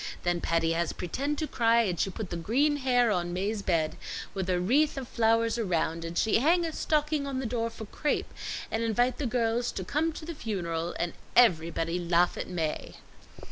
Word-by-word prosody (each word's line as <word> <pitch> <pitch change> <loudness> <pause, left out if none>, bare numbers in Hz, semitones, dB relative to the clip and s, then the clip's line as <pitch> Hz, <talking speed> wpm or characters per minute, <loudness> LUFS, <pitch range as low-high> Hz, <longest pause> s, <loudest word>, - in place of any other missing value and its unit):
Then 175 -1 0
Patty 165 -1 +1
has 170 0 0
pretend 280 - -2
to 310 - -1
cry, 230 -2 +3
and 180 -6 -2
she - - +1
put 190 0 -6
the - - -2
green 265 - +1
hair 245 -4 +3
on 175 -3 -1
Mae's 200 +4 -1
bed 165 -5 0 0.4
with 190 -2 -3
a 180 -1 +2
wreath 275 +12 +2
of 260 -2 -4
flowers 230 0 +2
around, 165 -5 0
and 165 +1 -5
she 220 - +3
hang 335 +6 +3
a 325 - -3
stocking 300 -2 0
on 275 -2 -3
the 260 - -2
door 230 0 -1
for 225 -1 -8
crape, 295 +8 -2 0.4
and 225 - 0
invite 240 +2 +1
the 285 - 0
girls 235 0 0
to 190 - -4
come 305 - 0
to 310 - -8
the 335 - -5
funeral, 175 - -3
and 175 0 -2 0.2
everybody 170 -5 +3
laugh 175 0 +2
at - - -4
Mae." 165 -4 -3
220 Hz, 200 wpm, -29 LUFS, 175-255 Hz, 0.4 s, cry